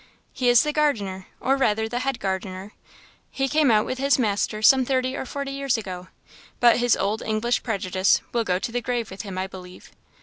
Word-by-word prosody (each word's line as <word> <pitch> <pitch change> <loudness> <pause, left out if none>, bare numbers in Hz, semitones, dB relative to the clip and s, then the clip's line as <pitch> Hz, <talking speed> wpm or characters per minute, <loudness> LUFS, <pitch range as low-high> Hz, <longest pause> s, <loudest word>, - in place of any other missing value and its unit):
"He 250 -1 +1
is 240 +2 +6
the 300 0 -2
gardener, 205 -12 -1
or 270 - +1
rather 220 -4 +1
the 240 +2 -3
head 270 0 -2
gardener. 190 +1 -4 0.6
He 270 0 -1
came 300 0 +3
out 215 -2 +4
with 255 - -4
his 275 +1 +3
master 215 -2 -1
some 265 +3 +6
thirty 255 0 -1
or - - -5
forty 280 +1 -5
years 275 -2 -1
ago, 185 -4 -7 0.5
but 240 -1 +5
his 245 -1 +2
old 205 +3 -1
English 220 +3 0
prejudice 190 -4 +1
will 235 -1 +1
go 180 -4 0
to 200 - -4
the 245 +1 -2
grave 240 -3 -3
with 190 - -6
him, 195 -4 -7
I 185 - -1
believe." 185 -1 -12
230 Hz, 205 wpm, -24 LUFS, 195-260 Hz, 0.6 s, is